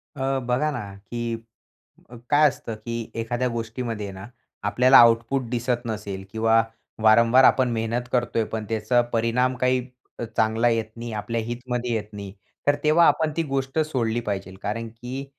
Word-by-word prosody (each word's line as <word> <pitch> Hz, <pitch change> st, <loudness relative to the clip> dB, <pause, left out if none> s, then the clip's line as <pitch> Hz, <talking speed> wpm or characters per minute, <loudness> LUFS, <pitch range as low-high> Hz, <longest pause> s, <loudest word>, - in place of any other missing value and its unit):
अ, 135 Hz, -1 st, -1 dB
बघा 125 Hz, +5 st, +1 dB
ना, 100 Hz, -8 st, -6 dB
की 115 Hz, +4 st, -5 dB, 0.8 s
अ, 120 Hz, -, -11 dB
काय 150 Hz, +1 st, +6 dB
असतं, 115 Hz, -5 st, -4 dB
की 115 Hz, +1 st, -5 dB
एखाद्या 120 Hz, +2 st, -1 dB
गोष्टीमध्ये 115 Hz, -2 st, -4 dB
ना, 95 Hz, +1 st, -9 dB, 0.4 s
आपल्याला 125 Hz, +6 st, +5 dB
आउटपुट 115 Hz, +3 st, +5 dB
दिसत 120 Hz, 0 st, -1 dB
नसेल 105 Hz, -4 st, -5 dB
किंवा 115 Hz, 0 st, +3 dB, 0.4 s
वारंवार 115 Hz, +4 st, +6 dB
आपण 130 Hz, -1 st, +5 dB
मेहनत 115 Hz, +2 st, -2 dB
करतोय, 120 Hz, -2 st, +1 dB
पण 110 Hz, 0 st, -5 dB
त्याचा 110 Hz, +2 st, +2 dB
परिणाम 120 Hz, +3 st, +1 dB
काही 125 Hz, +1 st, +2 dB, 0.4 s
अ, -, -, -3 dB
चांगला 110 Hz, +2 st, +3 dB
येत 115 Hz, -1 st, 0 dB
नाही, 120 Hz, 0 st, -6 dB
आपल्या 110 Hz, +2 st, -2 dB
हितमध्ये 120 Hz, 0 st, -3 dB
येत 105 Hz, -1 st, -4 dB
नाही, 100 Hz, -2 st, -7 dB, 0.3 s
तर 145 Hz, -, +5 dB
तेव्हा 155 Hz, +3 st, +5 dB
आपण 155 Hz, -1 st, +2 dB
ती 165 Hz, -, +2 dB
गोष्ट 135 Hz, +2 st, -1 dB
सोडली 120 Hz, -7 st, 0 dB
पाहिजे. 100 Hz, -4 st, -4 dB
कारण 115 Hz, +3 st, -3 dB
की 125 Hz, +4 st, -7 dB
115 Hz, 160 wpm, -24 LUFS, 110-125 Hz, 0.8 s, काय